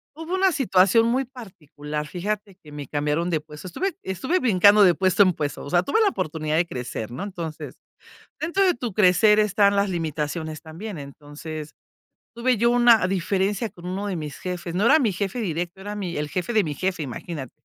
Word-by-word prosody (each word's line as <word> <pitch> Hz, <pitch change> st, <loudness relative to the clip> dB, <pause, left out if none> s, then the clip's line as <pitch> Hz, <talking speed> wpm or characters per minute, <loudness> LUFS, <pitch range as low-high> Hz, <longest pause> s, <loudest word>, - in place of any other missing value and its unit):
Hubo 325 Hz, +4 st, -4 dB
una 380 Hz, 0 st, +3 dB
situación 225 Hz, -, +3 dB
muy 260 Hz, +3 st, +1 dB
particular, 155 Hz, -, -7 dB
fíjate 200 Hz, +3 st, -4 dB
que 150 Hz, -, -15 dB
me 145 Hz, -3 st, -7 dB
cambiaron 150 Hz, +4 st, -1 dB
de 160 Hz, -, +1 dB
puesto. 150 Hz, +3 st, -11 dB
Estuve 360 Hz, -, -3 dB
estuve 260 Hz, -, -1 dB
brincando 205 Hz, -, +5 dB
de 180 Hz, -2 st, +6 dB
puesto 190 Hz, +3 st, +4 dB
en 185 Hz, -2 st, +2 dB
puesto, 145 Hz, -2 st, -4 dB
o 140 Hz, -, -7 dB
sea, 175 Hz, +2 st, +3 dB
tuve 445 Hz, -, +1 dB
la 420 Hz, -, +4 dB
oportunidad 155 Hz, -, -3 dB
de 175 Hz, -, +3 dB
crecer, 120 Hz, -4 st, -5 dB
¿no? 130 Hz, -, -5 dB
Entonces, 170 Hz, -6 st, -6 dB, 0.7 s
dentro 345 Hz, +5 st, +1 dB
de 360 Hz, -3 st, +3 dB
tu 240 Hz, -5 st, -5 dB
crecer 210 Hz, +2 st, +5 dB
están 200 Hz, -1 st, +3 dB
las 200 Hz, 0 st, +1 dB
limitaciones 155 Hz, -1 st, -3 dB
también. 170 Hz, +3 st, -8 dB
Entonces, 145 Hz, +2 st, -9 dB, 0.6 s
tuve 245 Hz, +1 st, +1 dB
yo 235 Hz, +3 st, +3 dB
una 240 Hz, -5 st, +5 dB
diferencia 195 Hz, +3 st, 0 dB
con 175 Hz, 0 st, -12 dB
uno 195 Hz, +3 st, -3 dB
de 195 Hz, -, -2 dB
mis 150 Hz, -4 st, -6 dB
jefes, 175 Hz, -2 st, -5 dB
no 205 Hz, +5 st, +1 dB
era 310 Hz, +4 st, +6 dB
mi 225 Hz, -9 st, +1 dB
jefe 200 Hz, +5 st, -3 dB
directo, 175 Hz, -1 st, -3 dB
era 205 Hz, +1 st, -6 dB
mi 185 Hz, -5 st, -4 dB
el 150 Hz, 0 st, -2 dB
jefe 185 Hz, +8 st, -3 dB
de 215 Hz, -3 st, +3 dB
mi 150 Hz, -2 st, -3 dB
jefe, 185 Hz, +1 st, -2 dB
imagínate. 135 Hz, +1 st, -7 dB
185 Hz, 195 wpm, -24 LUFS, 155-215 Hz, 0.7 s, de